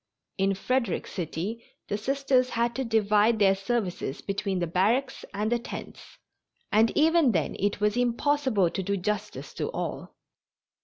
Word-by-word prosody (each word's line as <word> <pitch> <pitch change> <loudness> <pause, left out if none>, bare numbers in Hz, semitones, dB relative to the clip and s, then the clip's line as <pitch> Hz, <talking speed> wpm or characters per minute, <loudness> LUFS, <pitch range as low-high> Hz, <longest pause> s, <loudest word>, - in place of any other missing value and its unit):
In 195 0 +2
Frederick 235 +1 -1
City 190 +6 -4 0.2
the 205 - -1
Sisters 260 +2 +1
had 235 0 0
to 265 - -1
divide 220 -1 +3
their 195 -2 +5
services 195 - -2
between 195 -1 -2
the 175 - 0
barracks 220 +11 +1
and 210 +2 -2
the 240 - +2
tents, 235 - -9 0.5
and 220 +2 +5
even 315 -4 +4
then 160 -5 0
it 205 +1 0
was 210 +1 +1
impossible 245 - +1
to - - -2
do 200 +2 -1
justice 210 +2 -4
to - - -3
all. - - -5
215 Hz, 150 wpm, -27 LUFS, 195-245 Hz, 0.5 s, their